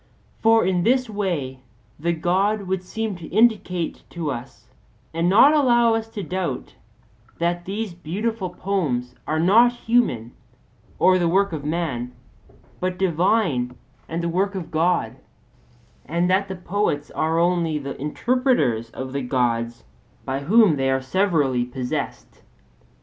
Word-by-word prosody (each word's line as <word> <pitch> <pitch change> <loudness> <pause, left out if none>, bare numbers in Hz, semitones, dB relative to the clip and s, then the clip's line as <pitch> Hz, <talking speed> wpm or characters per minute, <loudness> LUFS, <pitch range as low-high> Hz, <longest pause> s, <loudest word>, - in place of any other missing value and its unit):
For 225 -1 +5
in 180 -1 +1
this 255 +5 +2
way 170 -11 -2 0.4
the 170 +3 0
God 190 +5 +1
would 190 -1 -2
seem 220 +2 -4
to 165 -2 -9
indicate 200 -6 +1
to 165 -4 -3
us 120 -1 -8 0.5
and 165 +2 +1
not 250 +10 +7
allow 240 -6 +4
us 225 0 -1
to 210 -3 -6
doubt 180 -10 -4 0.6
that 175 +1 -1
these 205 0 -4
beautiful 190 +4 -3
poems 155 -10 -2
are 155 - 0
not 220 +8 +5
human, 225 - 0 0.7
or 185 0 +4
the 175 - +2
work 195 +3 +2
of 150 -3 -4
man, 145 -6 -2 0.7
but 185 0 -2
divine 170 - +1 0.3
and 165 +1 -3
the - - 0
work 195 +4 0
of 185 -4 -6
God; 160 -7 +1 0.9
and 170 +3 +1
that 195 +1 +2
the 190 - -5
poets 180 -5 -2
are 160 +1 0
only 170 -2 +1
the 140 -1 -5
interpreters 150 - +1
of 130 +2 -7
the 140 - -1
Gods 120 -2 -1 0.4
by 135 +1 -2
whom 185 +2 +4
they 135 0 +1
are 130 0 +2
severally 145 -6 +1
possessed. 125 0 -5
175 Hz, 140 wpm, -23 LUFS, 140-200 Hz, 0.9 s, not